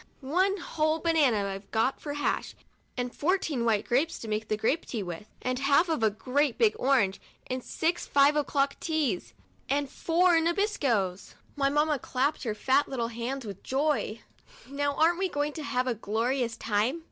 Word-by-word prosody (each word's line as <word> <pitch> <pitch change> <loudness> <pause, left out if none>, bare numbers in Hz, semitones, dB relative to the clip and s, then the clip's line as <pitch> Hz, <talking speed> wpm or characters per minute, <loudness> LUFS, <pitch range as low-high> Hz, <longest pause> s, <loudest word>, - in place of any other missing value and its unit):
" - - -36
One 370 +9 +1
whole 315 -3 0
banana 295 -11 +2
I've 195 +1 -7
got 230 +4 0
for 290 - -4
hash 290 - -1 0.4
and 245 0 -3
fourteen 310 -7 0
white 215 -3 +2
grapes, 290 +8 +1
to 230 - -8
make 215 0 -2
grape 275 +9 +1
tea 225 -5 -4
with, 175 +3 -7 0.2
and 255 0 -1
half 280 +5 +3
of 320 -7 0
a 220 - +4
great 255 +5 0
big 440 -2 +3
orange, 250 -8 +2 0.2
and 255 0 -4
six 335 +2 -1
five 285 +1 +4
o'clock 280 -1 +1
teas, 300 - -1 0.3
and 285 +1 +1
four 345 0 +3
Nabiscos!" 285 - 0 0.2
My 275 -2 +2
mamma 295 0 +1
just - - -15
clapped 275 +4 +1
her 215 -2 -1
fat 270 +6 +2
little 235 -4 -2
hands 240 +3 -4
with 200 -3 -7
joy. 270 -5 -1 0.2
" - - -21
Now, 285 +1 -1
aren't 335 +4 +3
we 380 -1 0
going 290 -1 -1
to 310 - -6
have 255 -2 0
a 255 - 0
glorious 230 +3 -1
time? 225 +9 0
275 Hz, 180 wpm, -28 LUFS, 230-310 Hz, 0.4 s, a